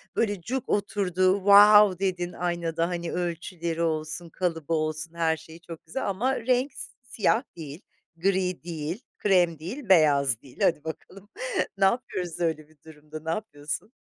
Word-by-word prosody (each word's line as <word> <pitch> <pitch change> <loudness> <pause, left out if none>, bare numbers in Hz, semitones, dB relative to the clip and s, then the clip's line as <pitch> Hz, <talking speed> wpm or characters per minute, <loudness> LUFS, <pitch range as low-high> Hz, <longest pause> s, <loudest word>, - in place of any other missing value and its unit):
böyle 205 -5 0
cuk 255 +8 -4
oturdu, 190 -2 +1
wow 205 -1 +7
dedin 180 -2 -1
aynada, 170 -1 -1
hani, 170 -1 -3
ölçüleri 170 -1 -3
olsun, 160 +1 -2
kalıbı 165 -3 -2
olsun, 155 +1 -2
her 160 -1 +1
şeyi 160 +1 -13
çok 165 -1 -11
güzel 200 +8 -3
ama 245 +8 0
renk 255 +2 +2 0.3
siyah 235 0 +1
değil, 155 +1 -8 0.4
gri 185 -1 0
değil, 170 - -4 0.2
krem 175 -6 +2
değil, 215 - -7
beyaz 140 - +4
değil; 130 -2 -17
hadi 150 -3 +2
bakalım 195 +5 -9 0.5
ne 195 - +4
yapıyoruz 190 -6 -1
öyle 160 -3 -1
bir 155 - -24
durumda? 155 0 -10
Ne 160 - -4
yapıyorsun? 165 0 -4
175 Hz, 145 wpm, -26 LUFS, 160-195 Hz, 0.5 s, wow